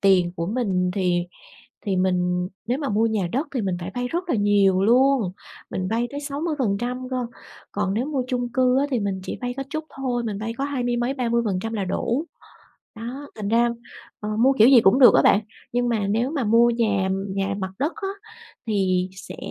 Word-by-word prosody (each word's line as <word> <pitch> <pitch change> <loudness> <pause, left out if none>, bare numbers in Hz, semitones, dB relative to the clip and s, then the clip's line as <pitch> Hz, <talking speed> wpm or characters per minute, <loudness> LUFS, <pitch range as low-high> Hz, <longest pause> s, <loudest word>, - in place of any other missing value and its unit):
tiền 185 -4 +4
của 165 - -2
mình 195 -5 0
thì 180 -2 +1 0.6
thì 195 -2 0
mình 180 -1 +1 0.2
nếu 250 +3 +1
mà 285 -3 -3
mua 215 +2 +2
nhà 210 -5 0
đất 280 +5 -1
thì 250 - 0
mình 185 -3 -1
phải 180 +3 -6
vay 245 0 -1
rất 345 +6 -3
là 255 - +2
nhiều 200 -2 +3
luôn, 245 -3 +4 0.4
mình 185 0 -2
vay 230 +3 0
tới 285 - -4
60% 255 -5 -2
cơ, 255 -1 -2 0.5
còn 195 -1 -1
nếu 240 +5 0
mua 280 -4 -1
chung 245 -2 -1
cư 255 +1 +3
á 285 - +2
thì 245 - +1
mình 200 -2 -2
chỉ - - -5
vay 245 0 -2
có 270 - -2
chút 310 +1 -3
thôi, 250 -3 -2
mình 210 -3 -3
vay 225 +1 -3
có 275 - -1
hai 280 -3 -2
mươi 240 0 0
mấy, 240 +3 0
30% 230 -5 -1
là 200 -3 -2
đủ. 240 - -1 0.7
Đó, 255 +6 -7
thành 210 -2 -4
ra, 235 +1 +3 0.5
ờ, 210 - -4
mua 265 +4 +4
kiểu 225 -2 +6
gì 255 -4 +8
cũng 210 +7 +4
được 250 - +9
á - - +6
bạn, 200 - +5 0.3
nhưng 245 0 +1
mà 215 -4 0
nếu 230 +7 0
mà 285 -6 -1
mua 230 +2 +5
nhà 210 -5 +1 0.2
nhà 195 +1 -2
mặt 190 0 -3
đất 300 +5 0
á 410 -3 -4 0.6
thì 185 -3 +1
sẽ 185 - -9
230 Hz, 210 wpm, -23 LUFS, 195-255 Hz, 0.7 s, được